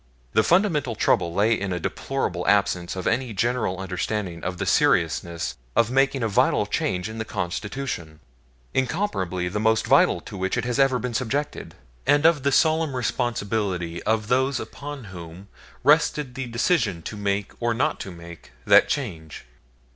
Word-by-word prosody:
The - - +5
fundamental 150 - +2
trouble 85 -4 +2
lay 105 +6 +3
in 100 -3 -2
a 90 - -1
deplorable 90 -3 -3
absence 95 -4 +2
of 95 - -5
any 120 0 0
general 115 -3 0
understanding 95 -1 -3
of 90 0 -3
the - - -2
seriousness 85 -5 +1 0.2
of 115 0 +3
making 135 -1 +2
a - - +2
vital 105 - +2
change 90 +1 -1
in 110 +1 -7
the - - -1
Constitution 95 - -4 0.5
incomparably 125 - -1
the 100 +4 -2
most 110 +1 +2
vital - - +4
to - - -10
which 95 +4 -1
it 120 - -1
has 125 +2 -1
ever 135 -2 +4
been 125 -1 -4
subjected 135 +5 -3 0.3
and 145 +2 +4
of 165 -3 +5
the 140 +1 +1
solemn 160 -1 +2
responsibility 100 -8 -2
of 110 -1 0
those 130 +2 +1
upon 145 -2 -7
whom 90 -1 -10 0.3
rested 150 -2 +3
the 135 0 -5
decision 115 - 0
to 110 - -6
make 100 -1 -1
or 120 0 0
not 130 - 0
to - - -6
make 85 -4 -12
that - - +6
change. 80 - -4
110 Hz, 160 wpm, -24 LUFS, 90-135 Hz, 0.5 s, that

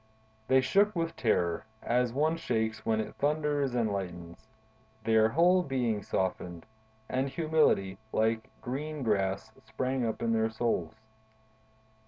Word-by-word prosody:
They 130 +1 +5
shook 200 +10 +3
with 165 -1 -1
terror, 85 -8 +1 0.2
as 125 0 +1
one 155 +6 +1
shakes 110 -7 -2
when 110 -1 +1
it 110 - -3
thunders 145 -3 0
and 110 -4 +1
lightens; 90 0 -6 0.6
their 110 -1 +4
whole 175 +7 +4
being 125 -9 -1
softened, 90 -3 -3 0.4
and 130 +2 -1
humility, 155 - +2
like 110 0 0
green 145 +3 -4
grass, 100 -1 0
sprang 125 +4 -2
up 115 0 -2
in 115 0 +1
their 110 0 +2
souls. 110 0 -1
115 Hz, 130 wpm, -30 LUFS, 110-145 Hz, 0.6 s, They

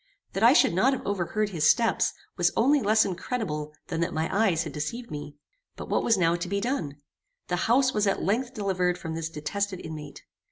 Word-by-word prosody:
That 195 - -2
I 235 +3 +7
should 290 - +4
not 245 +10 +3
have 265 - -5
overheard 200 +2 -1
his 160 -5 +2
steps, 230 -1 +2 0.2
was - - +2
only 280 +5 +4
less 215 +1 +4
incredible 180 -6 -3 0.2
than 165 -1 -2
that 170 0 -1
my 160 +3 -1
eyes 195 -6 +2
had - - -7
deceived 230 +11 -5
me. 145 -1 -7 0.4
But - - -8
what - - +2
was 225 - +3
now 170 -2 +3
to 175 +1 -4
be 200 +1 0
done? 200 - -2 0.5
The 180 - 0
house 260 +2 +4
was 210 -1 +1
at 195 - 0
length 240 +6 -1
delivered 185 -4 0
from 165 -2 -6
this 165 0 -3
detested 185 +5 -3
inmate. 155 -3 -8
190 Hz, 205 wpm, -27 LUFS, 165-225 Hz, 0.5 s, I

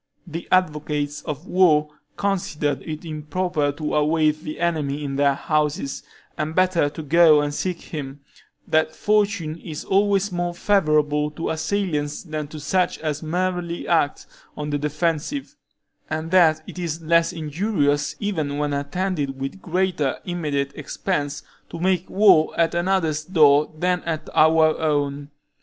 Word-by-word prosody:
The 165 -1 -7
advocates 150 -4 0
of 150 +3 -5
war 155 -6 +3 0.3
considered 155 -8 -1
it 155 +1 -7
improper 155 0 -1
to 150 +1 -4
await 155 0 +2
the 155 -2 -6
enemy 150 -4 -1
in 135 -1 -3
their 140 0 +3
houses, 150 -2 -1 0.3
and 155 +1 -3
better 185 -5 +3
to 155 +2 -8
go 155 0 +6
and 145 0 -2
seek 180 +2 -2
him; 140 -3 -7 0.5
that 160 0 +1
fortune 205 -7 +1
is 155 -2 -7
always 200 0 +2
more 175 -1 -2
favorable 155 -6 +2
to 155 +2 -4
assailants 160 -3 -2
than 155 -3 -4
to 155 +1 -9
such 180 +5 0
as 155 -2 -3
merely 175 +1 -2
act 160 -4 +1 0.3
on 150 0 -4
the 145 - 0
defensive, 160 - -2 0.5
and 160 +1 -3
that 160 -4 +4
it - - -9
is 165 -2 -4
less 170 +2 +3
injurious, 150 -3 0
even 155 -9 -2
when 145 0 -1
attended 145 -1 -2
with 135 +8 -5
greater 175 -5 0
immediate 150 -6 -2
expense, 145 -1 -3 0.3
to 170 - -7
make 185 0 0
war 185 -7 +4
at 165 -1 +3
another's 170 -3 0
door 150 -4 +4
than 180 +1 +1
at 160 -2 -3
our 160 0 +5
own. 145 -2 -1
155 Hz, 145 wpm, -23 LUFS, 150-175 Hz, 0.5 s, go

